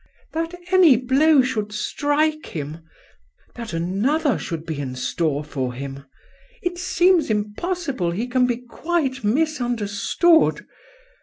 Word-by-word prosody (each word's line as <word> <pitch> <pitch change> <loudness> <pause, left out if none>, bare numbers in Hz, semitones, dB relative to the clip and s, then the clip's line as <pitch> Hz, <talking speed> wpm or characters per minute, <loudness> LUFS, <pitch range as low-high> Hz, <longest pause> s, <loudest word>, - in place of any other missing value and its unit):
" - - -35
That 330 +2 -2 0.2
any 360 -7 +7
blow 270 +3 +4
should 215 -5 -2
strike 290 +8 0
him!" 150 0 -6 0.4
" 70 +5 -37
That 235 -2 -6
another 220 - 0
should 165 -2 -5
be 160 -3 -4
in 130 -3 -4
store 150 +2 -1
for 130 -4 -3
him!" 135 +1 -7 0.3
" - - -30
It 355 -1 -2
seems 360 -3 +3
impossible 220 - -2
he 190 +8 -2
can 250 0 +2
be 240 -1 0
quite 265 +1 -2
misunderstood!" 245 - +2
245 Hz, 135 wpm, -22 LUFS, -, 0.4 s, any